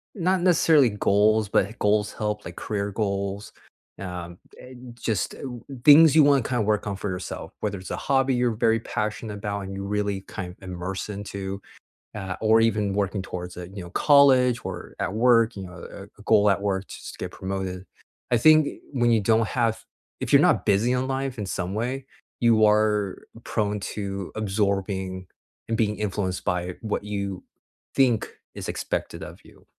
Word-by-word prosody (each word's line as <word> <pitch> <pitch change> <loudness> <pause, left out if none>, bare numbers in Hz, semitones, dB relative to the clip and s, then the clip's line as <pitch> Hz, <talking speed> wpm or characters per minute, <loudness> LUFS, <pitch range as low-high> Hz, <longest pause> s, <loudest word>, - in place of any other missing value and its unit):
not 185 0 +1
necessarily 160 -7 +5
goals, 105 +1 +2
but 100 +3 +1
goals 105 0 +1
help, 105 -1 -3
like - - -8
career 100 -1 -3
goals, 100 -1 -3 0.5
um, 90 -2 -6 0.2
and 125 -1 -12
just, 115 -3 -2
uh, - - -14 0.4
things 150 +1 +8
you 155 - +8
wanna 140 -1 +5
kinda 120 0 -1
work 105 0 0
on 100 - -2
for 100 +1 -4
yourself, 90 0 -6
whether 100 -1 -2
it's 95 -1 -9
a - - -2
hobby 135 -1 +1
you're 125 -1 +2
very 115 +1 +2
passionate 105 -2 -4
'bout 100 0 -3
and 95 0 -6
you 100 - -5
really 100 -1 -1
kinda 90 -2 -7
immerse 95 +2 -5
into, 100 -1 -5 0.5
ah, 95 -3 -5
or 110 +1 +5
even 105 -3 +1
working 100 -1 -1
towards 90 -1 -7
it, 90 0 -8
you 100 - -5
know, 85 - -9
college 130 -4 +5
or 90 -2 -7
at 95 - -2
work, 115 0 +4
you 95 - -6
know, 90 -2 -10
eh, - - -10
a - - -14
goal 105 0 +4
at 100 0 +1
work 100 -1 -1
just - - -9
to - - -13
get - - -5
promoted. 95 -1 -5 0.5
I 120 - +5
think, 155 +4 +6
eh, - - -6
when 120 -3 +2
you 115 -2 +3
don't 110 +2 +2
have 115 -3 0 0.4
if - - -3
you're - - +8
not - - +3
busy 115 +6 +3
on 130 +1 -1
life 135 -1 -2
in 105 - -3
some 95 +1 -3
way, 125 +4 -2 0.4
you 115 -2 +5
are 105 -2 +2 0.2
prone 105 -2 -1
to 100 -1 -5
absorbing 95 -3 -1 0.4
and 115 - -1
being 105 -2 +1
influenced 95 -3 -2
by 90 -1 -2
what 110 -3 -2
you 100 -2 -4 0.5
think 125 -5 +1 0.2
is - - -6
expected - - -3
of - - -10
you. - - -19
105 Hz, 180 wpm, -25 LUFS, 95-115 Hz, 0.5 s, things